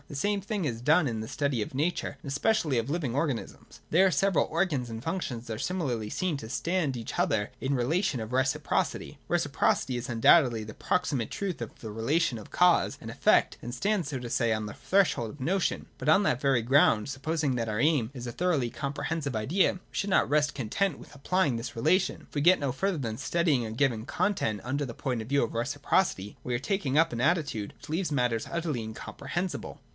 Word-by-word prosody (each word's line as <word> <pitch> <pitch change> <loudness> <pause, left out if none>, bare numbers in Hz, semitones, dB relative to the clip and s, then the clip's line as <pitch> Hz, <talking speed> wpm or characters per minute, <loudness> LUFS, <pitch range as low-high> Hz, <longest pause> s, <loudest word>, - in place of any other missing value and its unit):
The - - -9
same 205 +8 0
thing 200 -2 -2
is 115 -5 -3
done 155 +5 +4
in 115 -3 -2
the 110 - -5
study 140 -2 -1
of 105 - -4
Nature, 160 +6 -1
and - - -10
especially 155 - +1
of 115 +3 -3
living 145 -6 -1
organisms. 140 -5 -3
There 185 +4 +6
the - - +1
several 195 +3 +2
organs 155 -7 0
and 115 0 -6
functions 140 -7 -4
are 110 -1 -4
similarly 130 - -2
seen 185 - -1
to 110 -4 -8
stand 170 -2 0
to - - -4
each 115 - -6
other 105 0 +1
in 135 +1 0
the - - +1
relation 150 +3 0
of 110 +2 -6
reciprocity. 130 +1 0
Reciprocity 130 - +1
is 120 +1 -5
un 115 -1 -3
doubtedly 120 -5 +5
the 110 - -8
proximate 140 -8 -1
truth 190 -9 -4
of 115 - -6
the 110 - -7
relation 120 +5 +1
of 105 - -12
cause 180 -1 +3
and - - -8
effect, - - +3
and 120 +1 -6
stands, 200 -7 0
so 140 - -3
to 120 -1 -6
say, 115 0 +1
on 110 -1 0
the 105 - -6
threshold 185 - +1
of 145 - -10
the 130 - -6
notion; 190 +2 0
but - - -1
on 190 +6 +6
that 130 -10 +1
very 135 -5 +2
ground, 115 -4 +4
supposing 145 +1 -1
that 115 -2 -2
our 105 0 -2
aim 140 -5 +2
is 125 -1 -6
a - - -3
thoroughly 155 -10 0
comprehensive 145 0 -3
idea, 145 - +2
we 185 - -10
should 200 - -2
not 190 - +3
rest 150 +1 +2
content 140 - -1
with - - -14
applying 145 -1 +1
this 115 0 -5
relation. 170 +11 +1
If - - -21
we 145 - +1
get 180 +5 +6
no 140 -2 -1
further 190 +7 -1
than 115 -6 -3
study 170 +3 +1
ing 125 -4 +1
a 110 - -5
given 115 -2 0
content 115 - -1
under 140 +4 -1
the 120 -4 -5
point 125 -4 -2
of 110 - -8
view 140 0 +3
of 115 - -3
reciprocity, 120 - 0
we 125 - -2
are - - 0
taking 145 -1 -1
up 165 +1 +4
an 120 - -2
attitude 140 - 0
which - - -14
leaves 165 +2 -1
matters 125 -5 0
utterly 165 -7 -2
incomprehensible. 140 +10 -5
140 Hz, 220 wpm, -28 LUFS, 115-170 Hz, -, There